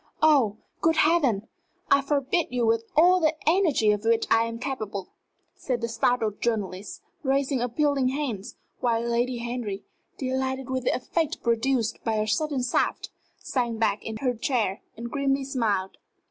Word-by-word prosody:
"Oh, 265 -10 +4 0.2
good 325 0 +3
Heavens! 295 -10 +3 0.5
I 280 - +6
forbid 285 +4 0
you 245 -1 0
with 225 0 +2
all 355 +4 +6
the 315 -2 +2
energy 320 - +4
of 210 0 -1
which 230 0 +2
I 225 0 +5
am 230 0 -5
capable," 215 -7 -4 0.4
said 250 -3 -3
the 235 - -2
startled 225 -2 0
journalist, 205 -4 -3 0.2
raising 270 -1 +1
appealing 270 +2 +1
hands, 255 -6 -3 0.2
while 230 -2 +1
Lady 240 +1 0
Henry, 235 -4 -4 0.3
delighted 265 0 -2
with 260 -1 -2
the - - +2
effect 320 +5 -2
produced 235 -1 0
by 225 -1 0
her 215 - +1
sudden 275 +4 0
shaft, 245 - 0 0.3
sank 240 -4 -2
back 210 -2 +1
in 220 0 -5
her 255 -2 +1
chair 225 -5 -1 0.2
and 235 +1 -6
grimly 275 -1 +1
smiled. 220 -8 -1
245 Hz, 155 wpm, -26 LUFS, 225-275 Hz, 0.5 s, I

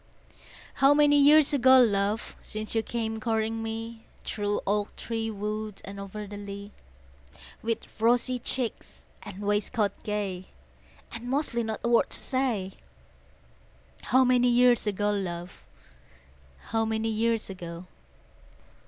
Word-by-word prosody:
How 275 +1 +7
many 295 0 +5
years 295 +1 +6
ago, 260 -1 +6
love, 210 -1 +1
Since 215 0 -5
you 225 - +2
came 225 -1 -3
courting 225 0 -1
me? 225 0 -6 0.2
Through 205 -1 -2
oak 205 +1 -1
tree 225 -1 -3
wood 210 0 -4
and 200 +1 -8
o'er 200 +2 -6
the 205 0 -8
lea, 200 0 -8 0.9
With 230 0 -4
rosy 245 +2 +3
cheeks 245 -1 -4 0.2
and 200 -1 -9
waistcoat 205 0 0
gay, 200 -3 -3 0.6
And 240 +2 -7
mostly 270 -3 0
not 220 -1 -4
a - - 0
word 235 - +3
to - - -1
say, 240 -8 -1 1.3
How 260 +3 +4
many 250 -1 +4
years 245 -2 +4
ago, 205 0 0
love, 180 -3 -5 1.1
How 225 0 +2
many 220 0 -1
years 225 0 0
ago? 175 -1 -8
220 Hz, 125 wpm, -27 LUFS, 205-240 Hz, 1.3 s, How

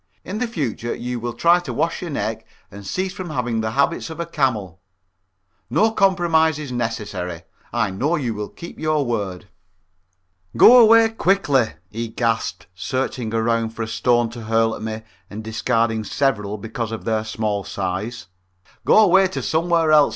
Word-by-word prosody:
In 205 +3 -4
the 250 - 0
future 130 - -3
you 125 0 -4
will 120 0 -4
try 170 +1 +4
to 175 - -6
wash 165 - -1
your 175 - -5
neck 110 -6 -3 0.3
and 100 0 -10
cease 185 - -2
from 185 -3 -6
having 120 -6 -1
the 110 - -1
habits 140 +4 +1
of 160 - -8
a 170 - -2
camel. 110 - -1 0.9
No 220 +1 +3
compromise 170 -6 +3
is 150 -4 -6
necessary. 105 -8 -4 0.3
I - - 0
know 140 - 0
you 130 -8 -2
will 105 -1 -5
keep 170 - -11
your 155 -2 +1
word." 100 -7 -3 1.1
"Go 250 +1 +9
away 225 0 +7
quickly," 180 - +1 0.2
he 115 +2 -4
gasped, 115 0 -2
searching 125 +4 -3
around 115 0 0
for 115 - -3
a - - -4
stone 120 0 +1
to 115 -2 -8
hurl 115 0 +2
at - - -10
me, 110 0 -5 0.3
and 105 +2 -7
discarding 115 0 0
several 105 -5 -1
because 115 +2 -5
of 115 - -6
their 110 -1 0
small 110 -2 -2
size. 100 +5 -4 0.6
"Go - - +4
away 190 -1 +5
to 190 - -5
somewhere 165 0 +2
else. 150 -1 +6
120 Hz, 170 wpm, -21 LUFS, 110-160 Hz, 1.1 s, Go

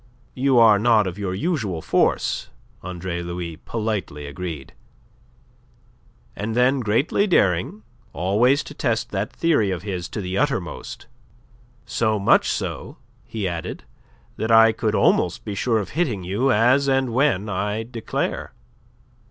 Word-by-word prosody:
"You 130 0 +2
are 110 -3 +6
not 110 -1 +4
of 95 +1 -5
your 95 -2 -2
usual 105 - -2
force," - - 0 0.3
Andre 90 -1 -5
Louis 85 -2 -5
politely 105 -9 -4
agreed. 75 -1 -7 1.6
And 110 +2 -4
then 125 +3 +3
greatly 125 - +1
daring, 100 - +1 0.3
always 110 - +2
to - - -10
test 120 -6 -1
that 100 +1 -2
theory 155 -12 +1
of 90 -2 -3
his 90 -4 -4
to - - -5
the 95 0 -2
uttermost: - - -3 0.8
"So 110 -2 0
much 100 - +3
so," - - -4 0.3
he 105 -4 -3
added, 85 -2 -5 0.5
"that 110 - -2
I 115 0 +7
could - - -1
almost - - +2
be 105 - -4
sure 115 +3 0
of 105 - -3
hitting 130 - -1
you 105 +10 0
as 125 +5 +3
and 135 -3 +1
when 125 -6 +2
I 105 +2 -2
declare." 115 -1 -4
105 Hz, 135 wpm, -22 LUFS, 90-120 Hz, 1.6 s, I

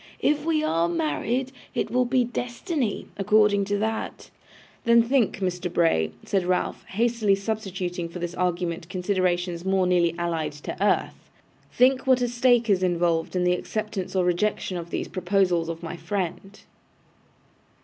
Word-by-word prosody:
'If 295 0 +1
we 315 -2 +1
are 170 - +1
married, 185 - -1 0.2
it - - -1
will 250 0 +2
be 250 0 +2
destiny, 245 - -3
according 205 0 +3
to 205 +1 0
that.' 220 +1 -3 0.5
'Then 235 0 +5
think, 245 -2 +1
Mr. 180 -1 -2
Bray,' 165 - +2
said 195 -2 +1
Ralph, 180 0 -1
hastily 225 -1 +1
substituting 190 -4 -3
for 170 - -8
this 175 0 -4
argument 175 -2 -2
considerations 180 -2 -1
more 190 0 +2
nearly 175 -2 +2
allied 165 -3 -2
to 145 - -7
earth, 205 - 0 0.4
'think 260 +1 +3
what 255 -1 +4
a - - +2
stake 240 -1 +3
is 195 -3 +3
involved 170 -2 +1
in 180 - +1
the 180 0 +3
acceptance 195 -1 -4
or 185 -1 +2
rejection 185 +1 0
of 170 -1 -5
these - - -3
proposals 180 -2 +1
of 165 0 -6
my 170 +1 -5
friend. 195 +1 -4
185 Hz, 150 wpm, -25 LUFS, 175-225 Hz, 0.5 s, Then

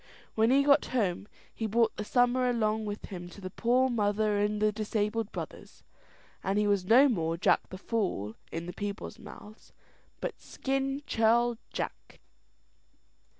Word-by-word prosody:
When 225 +1 +3
he 275 +2 +5
got 280 0 +5
home, 200 -3 0 0.3
he 225 - -3
brought 225 +1 +2
the 210 - -4
summer 245 +2 +2
along 220 -2 0
with 205 0 -5
him 175 -3 -8
to 190 - -13
the 185 -1 -7
poor 245 +5 +2
mother 210 -3 +1
and 210 +1 0
the 215 0 +3
disabled 215 +1 -2
brothers; - - -8 0.6
and 195 +1 0
he 210 - +3
was 200 -3 +1
no 250 +8 +7
more 165 -9 0
Jack - - +2
the 185 - -7
Fool 185 - -2 0.2
in 165 +1 -4
the 180 - -6
people's 205 +3 -5
mouths, 215 0 -13 0.5
but - - -5
"Skin 270 +1 -2
Churl 235 0 +2
Jack." - - -6
215 Hz, 155 wpm, -30 LUFS, 205-235 Hz, 0.6 s, no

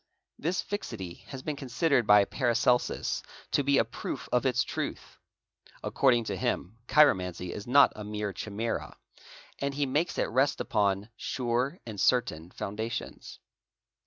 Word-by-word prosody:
This 170 +5 -1
fixity 100 - -6
has 130 -1 -8
been 155 - -2
considered 135 -2 +1
by 105 -1 +7
Paracelsus 125 0 +1 0.3
to 145 - +2
be 140 0 +3
a - - +4
proof - - -6
of - - +2
its - - +2
truth; - - -5 0.6
according 120 -4 +3
to 105 -3 -3
him, 95 +3 -2
chiromancy 90 - +3
is 105 - -7
not 140 +3 +6
a 105 - -7
mere 105 -1 -3
chimera, 110 +4 -4 0.6
and 140 0 -2
he 145 0 +1
makes 150 +6 0
it - - +2
rest 130 +4 +2
upon 100 -3 0
"sure 125 +4 -1
and 110 -4 -5
certain 85 -10 +1
foundations. 110 +5 -5
120 Hz, 140 wpm, -29 LUFS, 105-140 Hz, 0.6 s, by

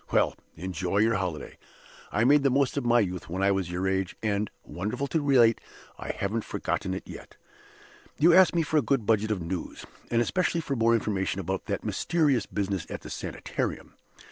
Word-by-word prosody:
Well! - - +3 0.2
enjoy 90 +2 -3
your 110 +2 +4
holiday. 90 -7 -4 0.5
I 110 - +1
made 145 +4 +5
the 140 - +3
most 135 0 +1
of 140 - -1
my 120 0 +4
youth 90 -4 -3
when 95 +3 -2
I 100 - +4
was 95 -3 -1
your 90 +2 -2
age; 95 -1 -1
and, 105 -1 0
wonderful 105 +9 -3
to 160 +3 0
relate, 125 -5 +4 0.4
I - - -7
haven't 105 +3 -2
forgotten 95 - -2
it - - -5
yet! - - -11 0.8
"You 165 +3 +5
ask 185 -1 +6
me 165 - +3
for 155 0 0
a - - +5
good 135 -7 0
budget 110 0 +2
of 100 -5 -1
news, 85 +1 -5 0.2
and 115 - +2
especially 170 +7 +1
for 140 -3 -3
more 115 -1 +3
information 100 -3 -1
about 95 0 -3
that - - -2
mysterious 145 -9 +1
business 100 -3 -2
at - - -6
the - - -9
Sanitarium. - - -4
110 Hz, 195 wpm, -27 LUFS, 95-135 Hz, 0.8 s, ask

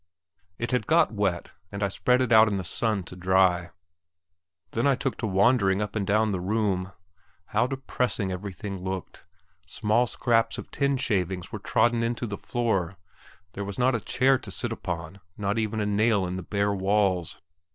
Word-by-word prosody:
It 120 - -3
had 125 -4 0
got 160 -6 +4
wet, 95 -5 -1 0.2
and 100 0 -3
I - - +3
spread 125 +5 +2
it 125 -2 0
out 110 0 +7
in 100 -2 0
the 95 - -3
sun 105 +2 -1
to 90 - -11
dry; 90 -1 +2 1.0
then 115 +5 +1
I 140 - +4
took 135 0 -2
to 110 - -2
wandering 100 0 +3
up 105 0 -3
and 100 -3 -1
down 110 +1 +2
the 95 - -1
room. 95 -1 -1 0.6
How 110 +4 +2
depressing 125 -6 -2
everything 95 0 -6
looked! 95 -2 -6 0.4
Small 115 +4 +1
scraps 115 -1 +1
of - - -8
tin 140 -1 +1
shavings 95 -7 -1
were - - -5
trodden 120 0 +2
into 115 +1 -1
the 105 -3 -4
floor; 100 -7 -1 0.6
there 100 - -4
was 100 -1 -6
not 125 +1 +3
a 115 - -1
chair 130 +6 +2
to - - -9
sit 120 - -3
upon, 90 -2 -5 0.2
not 105 +2 -1
even 110 0 -1
a 105 - 0
nail 105 -1 +2
in 90 0 -4
the 95 - -4
bare 100 +2 0
walls. 95 -3 0
105 Hz, 185 wpm, -26 LUFS, 95-115 Hz, 1.0 s, out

